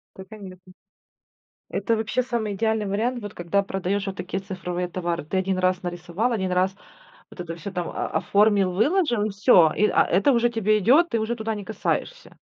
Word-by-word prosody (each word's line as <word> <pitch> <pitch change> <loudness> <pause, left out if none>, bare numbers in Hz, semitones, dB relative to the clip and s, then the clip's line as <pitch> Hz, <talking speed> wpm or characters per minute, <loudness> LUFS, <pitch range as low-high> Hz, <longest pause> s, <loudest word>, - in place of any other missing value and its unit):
Да, 190 - -9
конечно. 185 -4 -12 1.0
Это 230 - 0
вообще 220 +3 -1
самый 235 -4 -2
идеальный 220 +1 0
вариант, 230 +5 -1
вот 205 -1 -7
когда 175 +3 0
продаешь 195 0 -2
вот 195 - -4
такие 180 +2 -4
цифровые 180 -2 -4
товары. 170 -2 -3
Ты 180 +5 -2
1 190 0 0
раз 185 0 +1
нарисовал, 175 +6 -2
1 190 -5 -1
раз 185 +1 +1 0.6
вот - - -11
это 165 -1 -6
всё 180 +4 -7
там 175 -2 -3
о - - -3
оформил, 200 -2 +2
выложил, 240 - +1
и 215 - -1
всё. 195 -5 +5
И, 210 - +4
а, - - +3
это 195 +10 +3
уже 240 -1 +3
тебе 215 -2 +1
идет, 275 - +4
ты 230 - 0
уже 220 +2 -1
туда 220 -1 -3
не 205 -1 -7
касаешься. - - -4
200 Hz, 190 wpm, -24 LUFS, 185-220 Hz, 1.0 s, всё